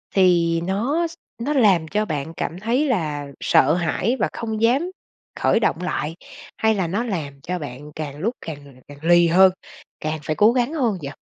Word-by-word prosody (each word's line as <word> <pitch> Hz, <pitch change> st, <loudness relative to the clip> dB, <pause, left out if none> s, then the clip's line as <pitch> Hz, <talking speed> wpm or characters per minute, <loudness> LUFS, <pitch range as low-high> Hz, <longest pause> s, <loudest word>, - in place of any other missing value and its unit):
thì 170 Hz, -3 st, +3 dB
nó 235 Hz, -, 0 dB
x 330 Hz, -, -12 dB, 0.3 s
nó 290 Hz, +4 st, 0 dB
làm 195 Hz, -, +4 dB
cho 210 Hz, +5 st, 0 dB
bạn 155 Hz, -2 st, -4 dB
cảm 170 Hz, -, -3 dB
thấy 240 Hz, +8 st, +1 dB
là 150 Hz, -, -1 dB
sợ 145 Hz, -, +4 dB
hãi 180 Hz, +7 st, 0 dB
và -, -, +1 dB
không 220 Hz, -2 st, -4 dB
dám 270 Hz, +10 st, +2 dB, 0.5 s
khởi -, -, +3 dB
động 180 Hz, -6 st, 0 dB
lại, 165 Hz, -3 st, -2 dB, 0.4 s
hay 220 Hz, 0 st, +2 dB
là 185 Hz, -4 st, 0 dB
nó 200 Hz, +7 st, -1 dB
làm 150 Hz, -, -4 dB
cho 180 Hz, +5 st, -3 dB
bạn 145 Hz, 0 st, -8 dB
càng 145 Hz, -2 st, -5 dB
lúc 220 Hz, +11 st, -2 dB
càng 140 Hz, -4 st, -9 dB
càng 145 Hz, -, -12 dB
lì 175 Hz, +1 st, +5 dB
hơn, 185 Hz, +3 st, +6 dB, 0.5 s
càng 155 Hz, 0 st, -3 dB
phải 155 Hz, -, -2 dB
cố 210 Hz, +6 st, +5 dB
gắng 250 Hz, +4 st, 0 dB
hơn 240 Hz, -10 st, 0 dB
vậy? 140 Hz, -, -4 dB
180 Hz, 190 wpm, -22 LUFS, 155-225 Hz, 0.5 s, hơn